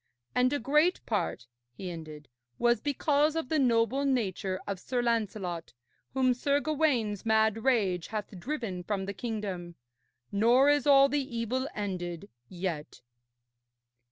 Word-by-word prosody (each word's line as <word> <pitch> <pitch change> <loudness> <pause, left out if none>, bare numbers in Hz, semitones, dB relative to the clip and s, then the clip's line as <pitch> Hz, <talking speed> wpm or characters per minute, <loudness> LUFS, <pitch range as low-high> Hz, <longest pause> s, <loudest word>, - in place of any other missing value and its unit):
And 250 +1 +3
a 290 - +1
great 300 +8 +3
part,' - - -2 0.3
he 180 +7 -6
ended, 155 -3 -9 0.3
'was 240 0 +2
because 290 +1 +1
of 325 -6 -2
the 315 - +2
noble 245 +1 +2
nature 200 -8 -1
of 200 -2 -4
Sir 245 +4 -2
Lancelot, 205 - -2 0.4
whom 255 -1 +3
Sir 280 +3 +1
Gawaine's 280 -10 0
mad 220 -1 +2
rage 200 -10 +1
hath 210 -3 -5
driven 225 - -4
from 195 +1 -2
the 200 - -4
kingdom. 195 -6 -5 0.6
Nor 240 +7 +5
is 290 0 +1
all 275 -1 +7
the 275 -4 -2
evil 255 +4 -1
ended 185 -3 -4 0.2
yet.' 175 -5 -5
230 Hz, 135 wpm, -29 LUFS, 190-270 Hz, 0.6 s, all